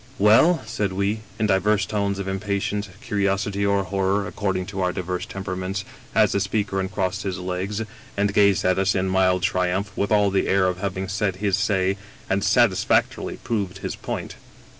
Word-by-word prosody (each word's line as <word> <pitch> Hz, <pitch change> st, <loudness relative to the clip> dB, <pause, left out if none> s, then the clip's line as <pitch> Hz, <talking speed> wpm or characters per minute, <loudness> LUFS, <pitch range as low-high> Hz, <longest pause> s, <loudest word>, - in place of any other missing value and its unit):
" -, -, -24 dB
Well? 165 Hz, +9 st, +5 dB
'* -, -, -15 dB
said 100 Hz, -2 st, -2 dB
we, 100 Hz, +3 st, 0 dB, 0.2 s
in 110 Hz, -, +1 dB
divers 100 Hz, 0 st, +2 dB
tones 100 Hz, 0 st, -1 dB
of 100 Hz, -1 st, -4 dB
impatience, 100 Hz, +1 st, -2 dB
curios 100 Hz, -1 st, 0 dB
ity, 100 Hz, 0 st, -2 dB
or 100 Hz, -1 st, +2 dB
horror, 95 Hz, +1 st, 0 dB
according 95 Hz, 0 st, -2 dB
to 95 Hz, -, -2 dB
our 90 Hz, -1 st, +1 dB
divers 90 Hz, +2 st, -3 dB
temperaments, 95 Hz, -1 st, -4 dB, 0.3 s
as -, -, +5 dB
the -, -, +1 dB
speaker 100 Hz, 0 st, -1 dB
uncrossed 95 Hz, 0 st, -2 dB
his 95 Hz, -2 st, -3 dB
legs 95 Hz, +4 st, -3 dB, 0.3 s
and 100 Hz, 0 st, +1 dB
gazed 100 Hz, -2 st, +4 dB
at 95 Hz, +1 st, +3 dB
us 95 Hz, 0 st, +2 dB
in 95 Hz, 0 st, +1 dB
mild 95 Hz, -1 st, +2 dB
tri 90 Hz, -1 st, +1 dB
umph, 100 Hz, +2 st, -3 dB
with 100 Hz, -, -1 dB
all 105 Hz, -2 st, +4 dB
the 95 Hz, -, +1 dB
air 95 Hz, -1 st, +3 dB
of 90 Hz, -1 st, 0 dB
having 95 Hz, -1 st, -3 dB
said 100 Hz, 0 st, -1 dB
his 100 Hz, 0 st, +1 dB
say, 100 Hz, -2 st, +1 dB, 0.3 s
and 100 Hz, 0 st, +1 dB
satis 105 Hz, -2 st, +3 dB
factorily -, -, +1 dB
proved 100 Hz, -5 st, -2 dB
his 95 Hz, -, -4 dB
point. -, -, -5 dB
95 Hz, 195 wpm, -23 LUFS, 95-100 Hz, 0.3 s, Well